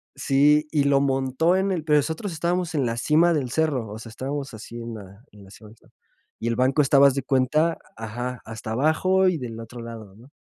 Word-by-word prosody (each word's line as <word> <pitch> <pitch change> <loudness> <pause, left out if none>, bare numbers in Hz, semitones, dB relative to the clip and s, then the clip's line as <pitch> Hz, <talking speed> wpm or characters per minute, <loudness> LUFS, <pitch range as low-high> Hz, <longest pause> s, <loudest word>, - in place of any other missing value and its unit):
sí, 150 +2 +3
y 150 -3 +2
lo 140 -1 +3
montó 135 +5 +1
en 190 +1 +1
el 175 -4 -2
pero 150 -2 +4
nosotros 160 +6 -3
estábamos 170 +1 -1
en 140 -4 +1
la 115 -1 -2
cima 160 +7 +3
del 140 -6 -1
cerro, 135 -5 -1
o 105 - -7
sea, 115 +1 -10
estábamos 135 +3 -5
así, 110 +2 -10
en 115 0 -6
la 100 +1 -12
en 105 -1 -16
la 95 - -16
cima 105 +1 -14
del 110 - -18
cerro. - - -27 0.5
Y 115 - -3
el 115 - 0
banco 130 +4 +2
estaba, 140 0 +5
haz 140 - +2
de 135 - -2
cuenta 140 +6 +1 0.2
ajá, 120 +3 -5
hasta 110 0 -7
abajo 160 +9 +2
y 180 - -1
del 115 -5 -7
otro 115 +1 -9
lado, 110 -4 -10
¿no? 120 +6 -17
135 Hz, 230 wpm, -24 LUFS, 115-155 Hz, 0.5 s, estaba